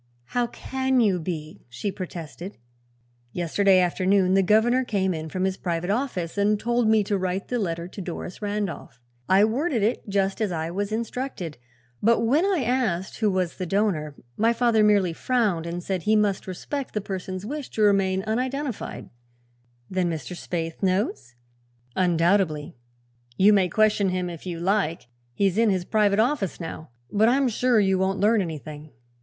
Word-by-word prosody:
"How 245 -1 +1
can 260 +2 -1
you 200 -6 +3
be?" 155 -2 -6
she 120 - -3
protested. 175 0 -7 0.8
"Yesterday 185 +3 +3
afternoon 185 +1 +2
the 195 - +5
governor 220 +6 +3
came 190 -6 0
in 160 -1 -5
from 185 +3 -2
his 190 0 0
private 175 +1 -2
office 205 -7 -2
and 205 +1 +2
told 240 0 +1
me 220 -1 +4
to 200 +1 -1
write 185 +1 -2
the 245 - 0
letter 170 -4 -2
to 195 - -8
Doris 180 +1 -6
Randolph. 205 -9 -4 0.3
I 195 +2 +6
worded 245 +1 0
it 215 -1 -1
just 195 +1 0
as 210 -3 0
I 165 -1 -3
was 200 +3 -3
instructed, 220 - -4 0.4
but 230 +1 +3
when 275 +10 +3
I 380 -8 +1
asked 220 -8 -1
who 215 -2 +2
was 185 -3 -1
the 185 - -3
donor 165 -7 0 0.2
my 230 +2 +3
father 235 -2 +3
merely 200 -5 +3
frowned 205 -6 0
and 175 +1 -4
said 190 -1 -2
he 215 +5 +2
must 205 -3 +1
respect 255 +9 -5
the - - +2
person's 190 -1 -5
wish 290 +3 -5
to 215 - -1
remain 195 -2 +3
unidentified." 255 +3 -3 0.8
"Then 185 -2 0
Mr. 160 +1 -5
Spaythe 165 -2 -4
knows?" 185 - -1 0.6
"Undoubtedly. 170 -4 +1 0.6
You 205 +3 +6
may 190 -3 +3
question 210 0 +3
him, 180 -1 -2
if 170 +2 -9
you 170 -2 -4
like; 170 -7 0 0.3
he's 195 - +1
in 230 -1 +4
his 185 -3 0
private 205 -1 +2
office 225 - 0
now. 165 -3 -7 0.2
But 215 +2 +4
I'm 270 +2 +3
sure 245 0 +2
you 190 -2 +2
won't 190 +1 0
learn 215 +1 +4
anything." 155 -3 -6
195 Hz, 170 wpm, -25 LUFS, 175-220 Hz, 0.8 s, I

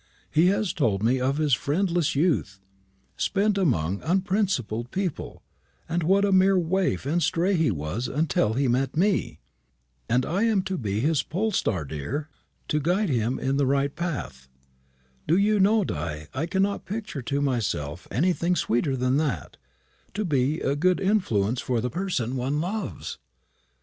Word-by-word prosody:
He 165 +3 +4
has 200 0 +1
told 105 -9 0
me 125 +3 +2
of 135 +3 0
his 150 -3 +1
friendless 170 - +1
youth, 140 - +1 0.6
spent 205 +1 +1
amongst 100 - 0
unprincipled 185 - 0
people, 185 -1 -4 0.4
and 175 +1 -1
what 195 +5 +3
a 200 - +1
mere 190 0 +5
waif 180 -2 0
and 165 +5 +1
stray 175 +4 +1
he 160 -4 +2
was 85 - -3
until 140 -7 +1
he 135 +3 +1
met 130 +4 0
me. 195 +3 +1 0.7
And 125 +1 +2
I 185 +5 -1
am 215 -5 +2
to 190 -2 -3
be 105 -2 -1
his 150 +1 +2
pole 200 +9 -2
star, 95 - 0
dear, 130 - -4 0.4
to 150 - +1
guide 180 +6 +1
him 120 -1 0
in 135 +1 -1
the 140 -2 +2
right 140 +1 +1
path. 125 - -5 0.8
Do 165 +4 +4
you 210 +1 +3
know, 210 +2 +4
Di, 80 - -4
I 145 +5 -2
cannot 195 +2 0
picture 205 -8 -5
to 140 +4 -2
myself 95 - -2
anything 175 +3 +1
sweeter 130 -1 0
than 130 +2 +1
that 150 -3 -2 0.6
to 210 0 -1
be 145 0 +1
a 140 - 0
good 180 +5 +2
influence 125 - +1
for 125 -2 -1
the 125 +2 -2
person 135 -8 -2
one 135 +4 -1
loves. 195 +5 -4
150 Hz, 160 wpm, -25 LUFS, 125-185 Hz, 0.8 s, mere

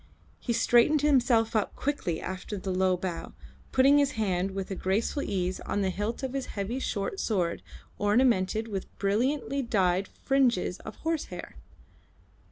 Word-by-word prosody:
He 240 - -3
straightened 245 +6 +4
himself 245 -6 +3
up 215 - 0
quickly 265 - -2
after 190 +2 -5
the 190 0 -4
low 185 0 +2
bow, 180 -2 -5 0.4
putting 275 +2 +5
his 280 -2 +2
hand 190 -4 0
with 195 0 -5
a - - -2
graceful 205 +10 0
ease 185 -4 -2
on 205 - -2
the 190 - +1
hilt 210 +7 -3
of 265 -1 -3
his 275 -1 -3
heavy 210 +6 -2
short 235 - -2
sword 180 -6 0 0.4
ornamented 215 -1 +2
with 195 -4 -4
brilliantly 260 +8 0
dyed 195 -6 +1
fringes 250 -9 +1
of - - -9
horsehair. 325 -2 -3
215 Hz, 150 wpm, -28 LUFS, 190-260 Hz, 0.4 s, putting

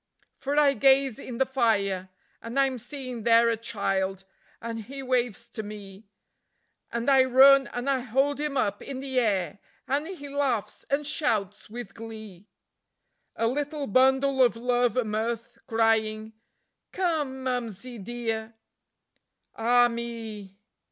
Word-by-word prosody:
For 280 +2 -3
I 290 -2 +5
gaze 270 -3 +3
in 240 - -7
the 265 - +3
fire, 200 -8 0 0.3
and 230 +4 -3
I'm 265 -2 +2
seeing 255 -1 -6
there 230 +1 +5
a - - +1
child, 195 -4 -2 0.3
and 225 -1 -6
he 275 +3 -7
waves 245 -3 -1
to 225 - -5
me; 205 -1 -10 0.8
And 235 +2 -3
I 270 -2 +6
run 270 +2 +7
and 245 +2 -5
I 275 -1 +2
hold 270 +4 0
him 295 -2 -2
up 205 -5 0
in 275 - -6
the 265 -1 -1
air, 200 -6 0 0.3
and 285 +4 0
he 345 -6 -8
laughs 275 -6 -2
and 285 +2 0
shouts 215 - -1
with 225 -3 -8
glee; 220 -4 -10 0.9
A 230 - 0
little 290 +3 -2
bundle 265 +3 +3
of 245 -2 +4
love 245 0 +1
and 225 -4 0
mirth, 230 +2 -3
crying: 220 -1 +1 0.6
"Come, 300 -8 -1
Mumsie 245 -2 -4
dear!" 225 +1 -4 1.0
Ah 240 +2 +4
me! 225 -4 -6
240 Hz, 140 wpm, -27 LUFS, 220-270 Hz, 1.0 s, run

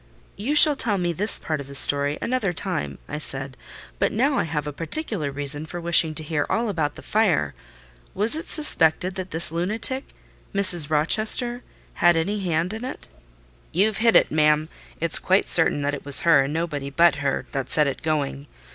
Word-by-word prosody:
"You 250 +9 -3
shall 300 -1 +10
tell 220 -6 -2
me 175 -2 -2
this 205 +6 +6
part 155 -2 -5
of 140 - -12
the 140 - -11
story 145 +1 +4
another 230 -7 -2
time," 180 -1 -5
I 150 - -6
said; 135 -2 -4 0.4
"but - - 0
now 270 +5 0
I - - -1
have 150 -1 -5
a 150 - -6
particular 165 - -4
reason 145 +1 -2
for 175 - -8
wishing 170 -2 +1
to 155 - -6
hear 150 -1 -3
all 230 0 -2
about 150 -7 -3
the - - -13
fire. 195 - -1 0.6
Was 215 +7 0
it 320 - -6
suspected 185 - +2
that 185 0 -7
this 165 0 +2
lunatic, 215 +10 -3 0.5
Mrs. 175 -6 +7
Rochester, 215 +10 0 0.3
had 175 -1 +2
any 200 +6 -2
hand 175 0 -3
in 220 +2 -8
it?" 260 - -9 0.6
"You've 205 +4 0
hit 230 0 +1
it, - - +3
ma'am: 150 0 +1 0.3
it's 165 0 +2
quite 190 +2 0
certain 160 -3 0
that 145 0 -2
it 140 - -7
was 140 -1 +3
her, 165 -5 +3
and 140 - -6
nobody 150 -4 -4
but 170 +4 +2
her, 140 -1 -3
that 135 -2 -5
set 150 - +1
it 140 - -5
going. 145 -2 -4
165 Hz, 190 wpm, -22 LUFS, 150-205 Hz, 0.6 s, shall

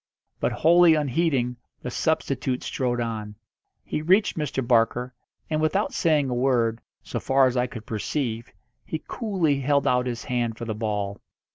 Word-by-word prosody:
But, - - 0
wholly 170 0 +5
unheeding, 140 -4 0 0.3
the 125 - -4
substitute 130 -4 -1
strode 125 -2 -1
on. 110 -3 -4 0.5
He - - -3
reached 190 +7 +3
Mr. 140 -5 -2
Barker, 120 +1 +2 0.3
and, 155 -1 -1
without 155 +7 +1
saying 155 -5 +2
a 125 - -2
word, 120 -3 +1 0.2
so - - -4
far 135 0 +3
as 130 -1 +1
I 125 0 +1
could 115 -3 -9
perceive, 115 +1 -3 0.3
he 160 - -5
coolly 185 - 0
held 140 +1 +2
out 125 0 +2
his 120 -1 -4
hand 120 -2 -1
for 120 - -5
the 110 - -2
ball. 105 -2 -3
125 Hz, 160 wpm, -25 LUFS, 120-155 Hz, 0.5 s, wholly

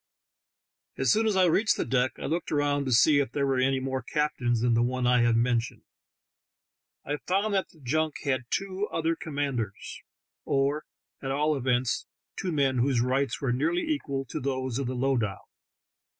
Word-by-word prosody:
As - - +2
soon 220 +1 +3
as 210 - +1
I 190 -1 +5
reached 200 +6 +3
the - - -1
deck 130 0 +1
I - - -6
looked 165 +4 -2
around 145 -1 +1
to 130 - -2
see 145 +5 +5
if 135 -5 -1
there 140 -1 +1
were 135 -2 +1
any 135 +1 +2
more 130 0 -2
captains 130 -4 0
than 120 0 +2
the 115 - +3
one 125 +1 0
I 125 0 +4
have 120 -1 +3
mentioned. 120 +1 0 1.2
I 145 +1 -2
found 200 +3 +1
that 190 -1 0
the 160 - -21
junk 155 +4 0
had 130 -3 0
two 195 +1 -2
other 165 0 0
commanders, 140 -10 -4 0.4
or 140 +2 0 0.4
at 135 - -4
all 150 +3 +1
events 125 -2 0 0.3
two 185 - -3
men 135 -4 +1
whose 130 0 +2
rights 130 +3 0
were 130 -3 0
nearly 165 +7 0
equal 140 - -2
to - - -3
those 130 -1 -2
of 135 - -2
the 130 - -3
lowdah. 125 -6 0
135 Hz, 180 wpm, -27 LUFS, 125-155 Hz, 1.2 s, I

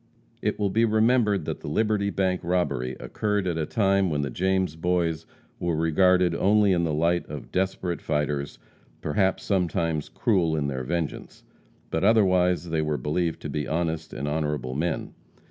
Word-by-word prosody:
It - - -1
will 100 -2 0
be 115 +3 +2
remembered 110 -4 +3
that - - -4
the - - -9
Liberty 105 +5 +1
bank 95 -2 0
robbery 85 -8 -1
occurred 105 -2 -1
at 85 -3 -1
a 75 - -1
time 100 -3 +2
when 75 -2 -1
the 70 - -3
James 95 +1 0
Boys 85 -1 -1 0.3
were 85 -2 0
regarded 90 +2 +3
only 100 +3 +3
in 85 -2 +2
the 80 - -1
light 85 +3 +1
of 75 -3 -8
"desperate 90 -3 -1
fighters 75 -2 -2 0.4
perhaps 95 +5 0
sometimes 85 -5 0
cruel 90 -8 +1
in 75 -2 -1
their 65 -1 -3
vengeance," 80 +3 -4 0.5
but 80 - -1
otherwise 90 -5 +3
they 80 -1 +1
were 75 -1 -1
believed 80 +5 -1
to - - -4
be 75 -2 -2
honest 80 0 -2
and 70 - -4
honorable 75 -4 -2
men. 80 +3 -2
85 Hz, 165 wpm, -26 LUFS, 75-95 Hz, 0.5 s, remembered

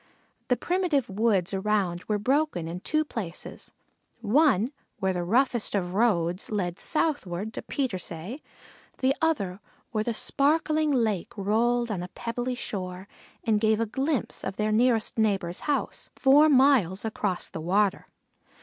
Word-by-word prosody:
The 250 - +2
primitive 335 - 0
woods 200 -3 +1
around 190 -3 0
were 210 - 0
broken 260 - 0
in 170 +2 -5
two 310 +10 0
places: 195 - -7 0.5
one 245 - +3 0.3
where 190 0 0
the 175 -1 -2
roughest 240 +3 +1
of 180 -2 -1
roads 185 -5 +1
led 180 -4 -2
southward 220 - -1
to - - -5
Petersay; 200 - -4 0.6
the 265 +1 +2
other 205 - 0 0.3
where 215 -2 0
the 230 0 -2
sparkling 310 +4 +1
lake 230 -3 0
rolled 235 +4 +1
on 190 -4 -2
a 180 - -5
pebbly 245 +5 -4
shore 185 -5 -5 0.4
and 215 -2 +1
gave 220 -1 +3
a 230 - +1
glimpse 265 +3 -2
of 190 - -4
their 215 +1 0
nearest 225 0 +2
neighbor's 195 -5 0
house 290 - -2
four 290 +3 +6
miles 255 - +4
across 205 -4 -2
the 160 - -7
water. 195 +4 +1
215 Hz, 140 wpm, -27 LUFS, 190-260 Hz, 0.6 s, four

